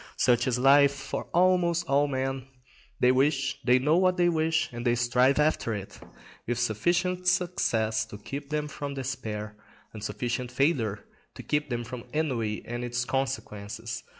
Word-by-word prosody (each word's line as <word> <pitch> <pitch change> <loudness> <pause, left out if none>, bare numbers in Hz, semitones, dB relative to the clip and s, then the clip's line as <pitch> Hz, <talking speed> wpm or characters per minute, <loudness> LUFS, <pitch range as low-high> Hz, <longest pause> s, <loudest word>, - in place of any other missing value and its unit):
Such 120 0 +3
is 125 -1 +1
life 140 +2 +5
for 135 - -5
almost 175 -1 +3
all 140 +1 +3
men; 135 -1 -3 0.5
they 125 - +5
wish, 135 0 +1
they 125 +1 +5
know 150 +6 +2
what 185 0 +3
they 175 -1 +4
wish, 160 -1 +1
and 120 0 -5
they 120 -1 +2
strive 125 +3 +3
after 150 -7 +1
it, 100 -1 -8 0.5
with 120 0 -1
sufficient 175 - 0
success 115 -12 +1
to 105 - -10
keep 140 +7 -7
them 150 0 -1
from 145 -1 -6
despair, 110 -5 -5 0.4
and 105 -2 -8
sufficient 120 +2 -3
failure 125 -7 0 0.3
to - - -9
keep 150 -1 -1
them 120 -1 -2
from 120 0 -8
ennui 120 -9 -1
and 120 +1 -4
its 120 0 -2
consequences. 115 -5 -3
130 Hz, 160 wpm, -27 LUFS, 120-150 Hz, 0.5 s, life